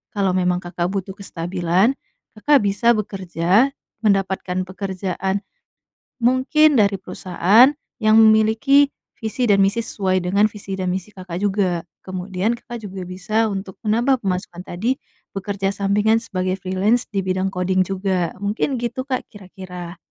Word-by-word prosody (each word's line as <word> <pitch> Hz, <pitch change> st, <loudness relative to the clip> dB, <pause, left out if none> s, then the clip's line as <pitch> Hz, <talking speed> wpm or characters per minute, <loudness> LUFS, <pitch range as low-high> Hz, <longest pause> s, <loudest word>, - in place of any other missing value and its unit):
Kalau 195 Hz, -2 st, +2 dB
memang 180 Hz, 0 st, +1 dB
Kakak 175 Hz, 0 st, -2 dB
butuh 195 Hz, 0 st, -3 dB
kestabilan, 180 Hz, +2 st, 0 dB, 0.5 s
Kakak 285 Hz, +1 st, +4 dB
bisa 215 Hz, +4 st, +3 dB
bekerja, 195 Hz, +4 st, +1 dB, 0.3 s
mendapatkan 190 Hz, -3 st, 0 dB
pekerjaan 190 Hz, 0 st, -3 dB, 0.8 s
mungkin 265 Hz, +3 st, +4 dB
dari 200 Hz, -1 st, +3 dB
perusahaan 205 Hz, -, +4 dB, 0.3 s
yang 215 Hz, -1 st, +4 dB
memiliki 220 Hz, +6 st, +5 dB, 0.3 s
visi 225 Hz, +2 st, -1 dB
dan 195 Hz, -1 st, +5 dB
misi 200 Hz, +4 st, +1 dB
sesuai 190 Hz, -4 st, 0 dB
dengan 200 Hz, +4 st, +2 dB
visi 200 Hz, -2 st, -6 dB
dan 185 Hz, -, -1 dB
misi 190 Hz, +3 st, -4 dB
Kakak 185 Hz, -2 st, -7 dB
juga. 190 Hz, -4 st, 0 dB, 0.2 s
Kemudian 185 Hz, +2 st, -2 dB
Kakak 240 Hz, -3 st, -9 dB
juga 185 Hz, -1 st, -7 dB
bisa 215 Hz, +5 st, 0 dB
untuk 195 Hz, -2 st, -5 dB
menambah 240 Hz, +4 st, +2 dB
pemasukan 180 Hz, -3 st, -3 dB
tadi 230 Hz, +10 st, -1 dB, 0.3 s
bekerja 195 Hz, 0 st, -2 dB
sampingan 205 Hz, +3 st, +2 dB
sebagai 185 Hz, -3 st, -3 dB
freelance 195 Hz, +6 st, +1 dB
di 195 Hz, -3 st, -2 dB
bidang 185 Hz, 0 st, 0 dB
coding 185 Hz, -1 st, 0 dB
juga. 190 Hz, -3 st, -1 dB
Mungkin 215 Hz, +7 st, 0 dB
gitu, 245 Hz, +2 st, -3 dB
Kak, 255 Hz, -2 st, -1 dB
kira-kira. 185 Hz, -3 st, -9 dB
195 Hz, 135 wpm, -21 LUFS, 185-220 Hz, 0.8 s, memiliki